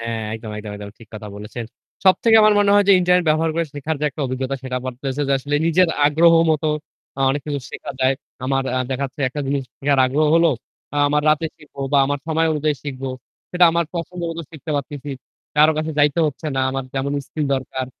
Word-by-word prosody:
হ্যাঁ, 115 -1 -3
একদম, 110 -1 -7
একদম, 105 -1 -7
একদম 100 0 -8
ঠিক 115 -2 -15
কথা 105 -1 -7
বলেছেন। 105 +3 -7 0.4
সবথেকে 195 +4 +5
আমার 215 0 +6
মনে 205 -1 +4
হয় 205 0 +5
যে - - +8
ইন্টারনেট 180 0 +3
ব্যবহার 160 +1 +2
করে 170 0 +1
শেখার 150 +2 -3
যে - - -1
একটা 155 - -8
অভিজ্ঞতা 130 +1 -3
সেটা 125 -1 -3
বাড়তেছে 130 +2 -3
যে - - +2
আসলে 145 +2 -1
নিজের 175 +1 +4 0.2
আগ্রহ 165 +3 +5 0.2
মত 155 -1 +1 0.6
আ - - -3
অনেক 145 +1 -1
কিছু 145 -2 -2
শেখা - - -7
যায়। 130 +1 +3 0.3
আমার 135 0 +1
আ - - +1
দেখাচ্ছে 135 +1 -3
একটা 145 +3 -5
জিনিস 140 0 0 0.2
শেখার 140 -1 +1
আগ্রহ 150 +4 +1
হলো, 165 0 +5 0.5
আ - - -2
আমার 150 +1 +1
রাতে 155 +2 +1
শিখব 150 -2 -20 0.2
বা 140 - +5
আমার 145 0 -1
সময় 160 0 +1
অনুযায়ী 150 -1 0
শিখবো। 135 -2 -5 0.4
সেটা 180 0 +4
আমার 170 0 +1
পছন্দ 175 +1 -5
মতো 165 0 -5
শিখতে 155 -1 -8
পারতেছি। 145 0 -5 0.5
কারো 155 +1 +6
কাছে 155 +1 -2
যাইতে 145 +3 +3
হচ্ছে 150 +2 -5
না। - - +2
আমার 135 0 -3
যেমন 140 +1 -1
স্কিল 150 -2 -3
দরকার 130 0 -4
145 Hz, 210 wpm, -21 LUFS, 130-160 Hz, 0.6 s, যে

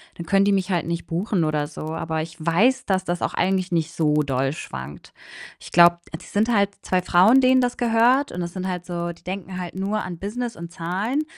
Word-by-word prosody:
dann 170 - -7
können 195 +3 +3
die 200 - +3
mich 195 0 0
halt 175 -3 0
nicht 170 0 -3
buchen 180 +1 -1
oder 150 -1 0
so. 155 - -9
Aber 160 -1 -2
ich 160 +1 -8
weiß, 215 +12 +2
dass 190 -1 0
das 175 -1 -3
auch - - -1
eigentlich 185 -1 0
nicht 165 -1 0
so 155 -3 +1
doll 135 0 -1
schwankt. 70 - -8 0.5
Ich - - -12
glaube 170 0 +6 0.2
die - - -14
sind 210 +3 0
halt 200 0 +3
2 185 -1 +1
Frauen, 190 +9 +5
denen 260 0 +5
das 245 -1 0
gehört 240 +4 +3
und 180 - -6
das 170 0 -4
sind 185 -1 -5
halt 180 -1 -4
so 175 -1 -3
die 170 - -17
denken 185 0 -5
halt 180 -1 -6
nur 200 +3 -1
an 180 -2 -6
Business 230 +4 -4
und 170 0 -9
Zahlen 190 - -2
180 Hz, 225 wpm, -23 LUFS, 170-205 Hz, 0.5 s, glaube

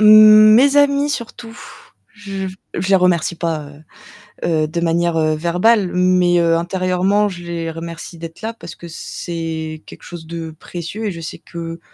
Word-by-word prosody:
Mmh, 215 0 +8
mes 275 +5 +5
amis 285 0 +3
surtout. 235 -3 -6 0.6
Je 195 -2 -6 0.3
je 185 +2 -2
les 195 - +6
remercie 180 -2 +1
pas, 165 -3 -3
heu 150 +2 -19 0.6
heu, - - 0
de 170 +2 -3
manière, 170 0 +1
heu, 155 -1 +1
verbale 180 +5 +2
mais 180 -1 +3
heu, 165 -1 +3
intérieurement, 185 +3 +1
je 175 -2 -9
les 170 -1 -4
remercie 165 +1 -8
d'être 165 0 -9
là 225 +1 -4
parce 170 -6 -10
que 170 - -11
c'est 160 -1 -6
quelque - - -13
chose 175 -2 -9
de 165 -1 -6
précieux 175 +7 -7
et 205 - -1
je 170 - -8
sais 160 - -7
que 165 0 -8
175 Hz, 170 wpm, -18 LUFS, 165-205 Hz, 0.6 s, Mmh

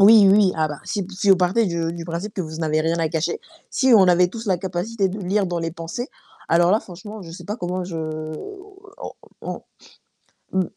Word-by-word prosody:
Oui, 205 0 +8
oui, 200 -3 +5
ah 155 -1 +1
bah, 150 -1 -6
si 200 -3 -2
si 195 +1 -2
vous 190 - +8
partez 190 +5 +2
de 170 -1 -1
du 170 0 -6
principe 175 +5 -4
que 190 - -3
vous 160 -2 -5
n'avez 155 -1 +1
rien 165 +1 +1
à 160 - +1
cacher, 165 - -1 0.3
si 260 -2 +3
on 190 -2 +6
avait 180 0 +5
tous 225 +2 -8
la 185 -2 +3
capacité 195 +3 -1
de 200 - -5
lire 200 +1 +1
dans 175 -2 -2
les 165 -1 -3
pensées, 165 +10 -5 0.4
alors 170 +2 +4
là, 215 - +5
franchement, 205 +3 -10
je 165 -3 -9
sais 170 - -9
pas 210 +2 -4
comment 180 -2 -3
je 175 -2 -5 1.0
on - - -6 0.3
on - - -5 0.9
mmh, 190 - +3
180 Hz, 215 wpm, -22 LUFS, 170-205 Hz, 1.0 s, Oui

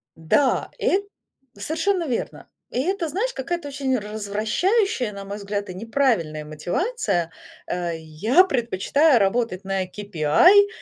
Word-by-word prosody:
Да, 165 - +1
эт 395 +2 +1 0.5
совершенно 330 - -1
верно. 245 -4 -4 0.2
И 250 - -1
это, 360 +3 -1
знаешь, 420 - -2
какая-то 315 +4 -4
очень 275 -2 -1
развращающая, 220 - 0
на 200 0 -8
мой 200 +1 -6
взгляд, 205 0 -4
и 180 - -6
неправильная 210 - 0
мотивация. 175 - -2 0.4
Э, 175 -1 -2
я 165 - +3
предпочитаю 255 - +2
работать 200 -1 0
на 195 -1 -1
KPI 205 - +4
225 Hz, 120 wpm, -23 LUFS, 195-320 Hz, 0.5 s, KPI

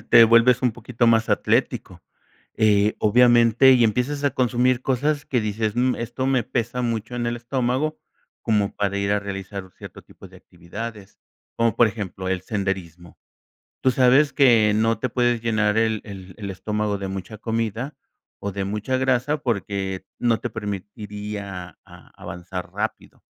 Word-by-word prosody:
eh, - - -18
te 115 -1 +9
vuelves 115 +2 +5
un 125 - +2
poquito 120 +1 -1
más 115 -1 +3
atlético. - - 0 0.6
Eh, 105 -1 +3
obviamente, 120 +3 +5
y 120 -2 +4
empiezas 125 +6 0
a 140 - +3
consumir 125 0 +1
cosas 145 +3 0
que 125 - 0
dices, 110 +1 -2
mm, 125 +1 +2
esto 120 +3 -3
me 130 -3 +2
pesa 120 +1 -2
mucho 115 -1 -3
en 120 -1 -2
el 120 0 -1
estómago, 130 +5 -1 0.4
como 105 -2 0
para 100 -1 -1
ir 100 0 0
a 105 - +1
realizar 95 -1 -6
cierto - - -11
tipo - - -15
de - - -16
actividades, 100 +4 -9 0.4
como 115 -2 +1
por 120 - +6
ejemplo, 95 -3 -5
el 95 -1 -1
senderismo. 95 -5 -4 0.6
Tú 130 - +3
sabes 130 +4 +4
que 115 -6 +5
no 115 +1 +2
te 130 - -2
puedes 120 -1 +1
llenar 110 -2 +1
el 110 -1 +1
el 95 -3 -10
el 100 -2 -6
estómago 105 +1 -2
de 95 - -5
mucha 95 +2 -6
comida, 115 +4 -3 0.4
o, 100 - -4
de 100 0 -3
mucha 105 +6 -2
grasa 130 +3 +1
porque 100 -6 -3
no 115 -3 +2
te 120 - -4
permitiría 105 -3 -6
a - - -16
avanzar 90 +1 -7
rápido. - - -5
110 Hz, 160 wpm, -23 LUFS, 100-120 Hz, 0.6 s, te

